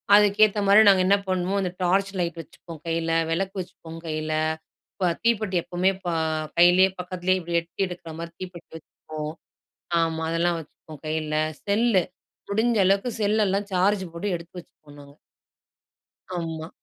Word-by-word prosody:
அதுக்கேத்தமாரி 205 0 +5
நாங்க 190 -2 +6
என்ன 200 +1 +5
பண்ணுவோம், 185 +1 0
அந்த 180 -2 -2
டார்ச் 195 +2 +2
லைட் 170 -1 -2
வச்சுப்போம் 160 0 -13
கையில. 165 0 -1 0.2
விளக்கு 195 +4 -1
வச்சுப்போம், 165 -2 -8
கையில. 155 -1 -3 0.6
இப்ப 180 -3 0
தீப்பெட்டி 215 -4 +1
எப்பவுமே 180 +2 +1
ப - - -3 0.5
கையிலயே 180 +2 +6
பக்கத்துலயே, 185 +1 0
இப்பிடி 170 -1 -1
எட்டி 170 +3 -3
எடுக்கிறமாரி 170 -1 -8
தீப்பெட்டி 180 -2 -9
வச்சுப்போம். 155 -1 -8 0.7
ஆமா. 160 0 -1
அதெல்லாம் 170 +1 +1
வச்சுப்போம், 155 -1 -13
கையில. 155 -1 -2 0.3
செல்லு. 205 -2 +3 0.5
முடிஞ்ச 225 +2 +2
அளவுக்கு 195 +5 +2
செல் 210 +1 +2
எல்லாம் 200 +1 -1
சார்ஜ் 190 +2 +2
போட்டு 195 +5 -3
எடுத்து 170 +2 -10
வச்சுப்போம் 150 -4 -17
நாங்க. 140 0 -16 1.2
ஆமா. 160 -1 -4
180 Hz, 135 wpm, -25 LUFS, 165-195 Hz, 1.2 s, நாங்க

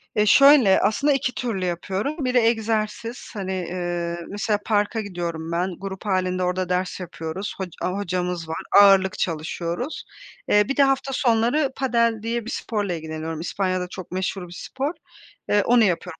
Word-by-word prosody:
Ya, 210 -1 +3
şöyle, 260 -2 +7
aslında 280 +8 +2
2 265 -2 0
türlü 215 -7 -2
yapıyorum. 195 - -2
Biri 250 0 +2
egzersiz, 225 0 0
hani, 195 -3 -4
eee, 175 -1 -3
mesela 205 +1 -1
parka 215 +1 +1
gidiyorum 170 -5 -5
ben, 175 +2 -1
grup 195 0 -7
hâlinde 185 -2 0
orada 180 0 -1
ders 180 +1 -1
yapıyoruz, 175 +2 -5
hoca 190 -2 -5
aaa, 185 +2 -1
hocamız 180 -3 -2
var, 160 - -3 0.2
ağırlık 195 -1 +5
çalışıyoruz. 170 - -3 0.5
Eee, 210 - +5
bir 275 - -2
de 285 - +6
hafta 270 0 +1
sonları 245 +4 +2
padel 235 -4 +1
diye 230 0 -2
bir 235 - -5
sporla 205 -5 -2
ilgileniyorum. 160 0 -5
İspanya'da 185 +1 -1
çok 185 -1 -9
meşhur 185 0 -3
bir 175 - -11
spor. 270 - -4 0.6
Eee, 205 -1 +3
onu 240 -1 +5
yapıyorum 180 -3 -1
195 Hz, 160 wpm, -23 LUFS, 180-230 Hz, 0.6 s, şöyle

